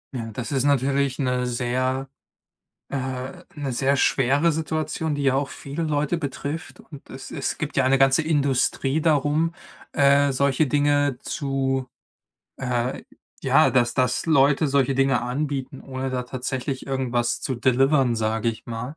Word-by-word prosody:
Ja, 115 -2 -4
das 120 +5 -5
ist 135 -1 +1
natürlich 140 -1 +1
'ne 125 -2 0
sehr 130 +2 -1 0.8
äh, 140 - -2 0.6
'ne 145 -4 -4
sehr 135 +3 +1
schwere 140 +5 +3
Situation, 155 0 -2
die 145 - -2
ja 135 -1 +2
auch 140 0 0
viele 145 +4 -5
Leute 150 +2 0
betrifft. 145 +2 -5
Und 145 -4 -13
es 130 +1 -9
es - - -3
gibt 150 -1 -4
ja 135 - +4
eine 135 +1 +3
ganze 135 +3 +4
Industrie 140 -1 +1
darum, 155 +1 +2 0.4
äh, 140 0 +4
solche 140 +3 +2
Dinge 145 -1 +2
zu, 135 -2 -2 0.7
äh 125 0 -2 0.4
ja, - - +5
dass 120 -1 +2
dass 125 -2 0
Leute 145 -1 +4
solche 135 -1 +2
Dinge 135 -2 +2
anbieten, 135 +1 -3
ohne 130 0 -4
da 125 -1 -2
tatsächlich 130 +2 -4
irgendwas 125 -3 -1
zu 130 - -2
delivern, 130 0 +3
sage 110 +1 0
ich 115 - -5
mal. 120 +6 -6
135 Hz, 150 wpm, -24 LUFS, 130-145 Hz, 0.8 s, ja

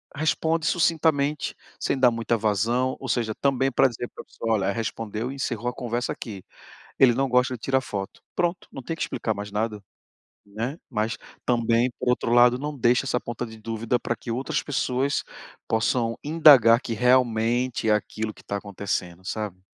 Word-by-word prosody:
responde 160 +1 0
sucintamente, 155 -4 +1 0.2
sem 135 - 0
dar 125 -2 +6
muita 115 0 0
vazão, 115 +5 +1
ou 130 - -7
seja, 115 -3 0
também 135 -1 +1
pra 130 - +4
dizer 120 0 -5
pra - - -9
pessoa: 115 -1 -2
"Olha, 100 -1 0
respondeu 115 +2 -3
e - - -7
encerrou 120 -3 -3
a - - -6
conversa 120 0 -3
aqui, 100 -6 -8 0.6
ele 125 -3 +6
não 135 +1 +1
gosta 125 +1 +2
de 115 - -8
tirar 135 +1 +1
foto". 100 -4 -6 0.2
Pronto, 175 +1 0
não 135 - -7
tem 165 +6 -4
que - - -4
explicar 110 - -2
mais 105 0 -6
nada, 105 0 -2 0.7
né? 115 +10 -4
Mas 110 -1 -1 0.3
também, 120 0 +2
por - - -2
outro 120 -1 0
lado, 120 +1 +6
não 150 +1 -4
deixa 125 +3 +3
essa 125 - +1
ponta 120 +1 -5
de 110 0 -11
dúvida 115 +2 -1
pra 120 - -1
que 115 - -8
outras 135 +6 -1
pessoas 135 -1 -1 0.4
possam 115 +1 +1
indagar 145 -7 +7
que 115 - -5
realmente 120 -1 +2
é - - +5
aquilo 110 +1 -3
que - - -18
tá 100 - -3
acontecendo, 95 -3 -4
sabe? 100 -3 -4
120 Hz, 180 wpm, -25 LUFS, 110-130 Hz, 0.7 s, indagar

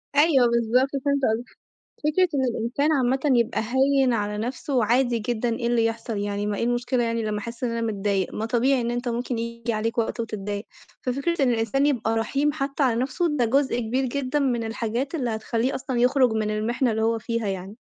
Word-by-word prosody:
أيوه 290 -4 +5
بالضبط 235 +3 +2 0.2
فهمت 280 0 +2
قصدك، 235 +3 -4 0.5
فكرة 360 +4 +3
إن 265 -2 +2
الإنسان 250 +6 0
عامةً 265 -1 +2 0.2
يبقى 235 0 0
هيّن 270 -1 +3
على 210 -1 -1
نفسه، 255 +5 -3
وعادي 240 +1 +2
جدًا 235 +2 -1
إيه 235 - -2
اللي 235 -1 +2
يحصل 225 -1 -2
يعني 205 0 -2
ما 210 -1 -1
إيه - - -1
المشكلة 245 +1 0
يعني 230 -1 -1
لما 210 -1 -2
أحس 235 +4 -6
إن 240 - 0
أنا 230 - -2
متضايق، 200 -4 -1
ما 220 - -2
طبيعي 250 +3 +2
إن 235 0 -1
إنت 245 +1 -2
ممكن 240 0 -2
ييجي 235 0 -3
عليك 225 +2 -2
وقت 230 +1 0
وتتضايق، 205 -2 -4 0.4
ففكرة 275 +5 -1
إن 250 - +4
الإنسان 235 +5 +1
يبقى 225 -5 +1
رحيم 275 +7 +1
حتى 275 0 -2
على 240 -3 +2
نفسه 295 +4 0
ده 245 - +2
جزء 265 +1 +1
كبير 250 +4 -1
جدًا 275 +2 -1
من 245 -5 0
الحاجات 230 +5 -3
اللي 255 -7 -1
هتخليه 225 +3 -1
أصلًا 260 -1 -3
يخرج 255 -1 +4
من 215 -1 0
المحنة 235 +4 0
اللي 220 0 -1
هو 225 +1 +2
فيها 230 -1 -2
يعني. 190 +2 -5
235 Hz, 200 wpm, -24 LUFS, 225-265 Hz, 0.5 s, أيوه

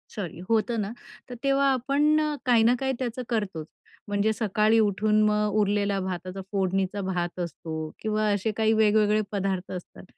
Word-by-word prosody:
Sorry, 180 -6 -5
होतं 225 0 +1
ना 200 - -3 0.4
तर 245 - -6
तेव्हा 275 0 +3
आपण 285 +4 +2
अ, 300 -1 -1
काही 235 -3 +4
ना 240 +2 +4
काही 265 0 0
त्याचं 250 0 -3
करतोच. 200 -9 -2 0.4
म्हणजे 205 +1 +1
सकाळी 215 +1 +2
उठून 215 0 +2
मग 210 0 +2
उरलेला 200 -1 +1
भाताचा, 185 +1 -5
फोडणीचा 195 0 0
भात 180 -2 -3
असतो 165 -1 -5 0.3
किंवा 215 0 0
असे 205 +2 0
काही 220 0 +3
वेगवेगळे 215 -1 +3
पदार्थ 195 -2 -2
असतात. 180 -1 -8
210 Hz, 160 wpm, -26 LUFS, 195-225 Hz, 0.4 s, काही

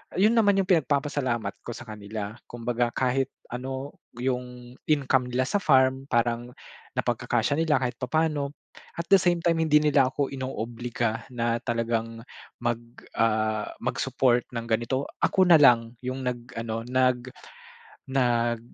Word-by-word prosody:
Yun 205 +5 +4
naman 205 -2 +4
yung 195 - +3
pinagpapasalamat 140 - +1 0.2
ko 120 - -4
sa - - -8
kanila, 105 -2 -6 0.2
kumbaga 120 0 -1
kahit 130 0 +1 0.2
ano 130 +3 -5 0.2
yung 125 -1 -4 0.2
income 135 -4 +2
nila 125 +1 0
sa 200 +10 0
farm 130 -4 +3
parang 120 0 0 0.4
napagkakasya 145 +2 0
nila 165 -2 +3
kahit 125 - -3
papaano. 145 +1 0 0.4
At 170 0 -5
the 195 - +8
same 175 -2 +1
time 165 -1 +2
hindi 155 -2 +4
nila 145 -3 +4
ako 140 +1 -2
inoobliga 120 -3 -3
na 120 -1 -1
talagang 115 -1 -2 0.4
mag 120 -1 0 0.4
ah 110 -1 +1 0.2
mag-support 125 -1 +1
ng 115 - -2
ganito, 120 +4 -1
ako 190 - +3
na 170 -4 +7
lang 115 -4 +5
yung 130 +1 -4
nag-ano, 115 -2 -4
nag 125 -1 +1 0.9
nag 120 -3 +1
125 Hz, 135 wpm, -26 LUFS, 120-140 Hz, 0.9 s, the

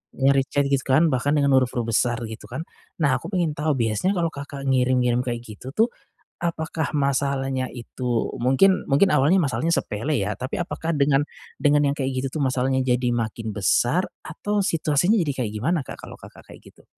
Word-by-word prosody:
Nyari 135 0 +3
chat 140 - +1
gitu 135 - +3
kan, 150 +4 +3
bahkan 140 +4 +1
dengan 140 -1 +2
huruf-huruf 120 -2 0
besar, 120 +2 +2
gitu 110 -2 -8
kan. 130 +7 -5 0.4
Nah 130 -2 +3
aku - - -8
pengen 170 -4 +1
tahu, 150 -1 +1
biasanya 115 - 0
kalau 165 -2 0
Kakak 140 -1 -8
ngirim-ngirim 125 -2 +2
kayak 120 -1 -3
gitu 120 +4 -9
tuh, 225 +2 +3 0.5
apakah 160 -2 -2
masalahnya 135 -2 0
itu, 120 0 -3
mungkin 135 +10 +4
mungkin 145 +8 +5
awalnya 150 +7 +4
masalahnya 160 +2 0
sepele 135 +7 -1
ya, 100 +1 -2
tapi 130 - -4
apakah 170 -1 -3
dengan 140 0 +3 0.4
dengan 145 0 +4
yang 140 - 0
kayak 135 -2 -2
gitu - - 0
tuh - - +1
masalahnya 130 0 +1
jadi 125 -1 +1
makin 110 -1 -3
besar 120 - +2 0.2
atau 210 0 -2
situasinya 165 +1 +2
jadi 150 -3 0
kayak 105 - -4
gimana 165 +10 0
Kak, - - -6
kalau - - -10
Kakak - - -14
kayak - - -13
gitu? - - -22
135 Hz, 185 wpm, -23 LUFS, 125-155 Hz, 0.5 s, mungkin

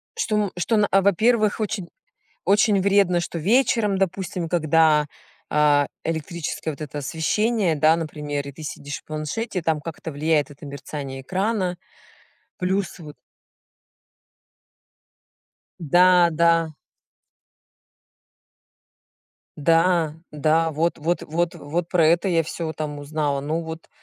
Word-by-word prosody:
Что, 225 - -1
м, 205 -3 0
что, 210 +2 +2
а, 195 - +5
во-первых, 215 +3 +2
очень 205 -4 -3 0.5
очень 200 0 +3
вредно, 195 -3 +3
что 170 0 -4
вечером, 210 - +2
допустим, 185 -2 -2
когда, 160 -2 +3 0.5
а, 145 -1 +4 0.2
электрическое 160 -1 -3
вот 140 - -12
это 150 0 -6
освещение, 170 - 0
да, 155 +2 +4
например, 150 -3 -4
и - - -6
ты 155 +3 -11
сидишь 145 0 -6
в - - -27
планшете, 160 +7 -4
там 160 -1 0
как-то 160 +1 -7
влияет 150 0 +1
это 145 +1 -12
мерцание 140 -1 -7
экрана, 185 +2 -1 0.8
плюс 190 +1 -1
вот 150 -3 -10 2.7
Да 175 +2 +5
да. 165 0 +3 2.8
Да 165 +1 +2 0.2
да, 160 +2 +1
вот 165 +3 0
вот 170 +3 -1
вот 170 +2 -1
вот 170 +4 -3
про 170 -4 +3
это 170 +3 +3
я 165 -3 +2
всё 160 0 -5
там 150 -2 -5
узнала. 145 -1 -2
Ну 155 +4 -2
вот 160 0 -8
165 Hz, 120 wpm, -23 LUFS, 150-185 Hz, 2.8 s, а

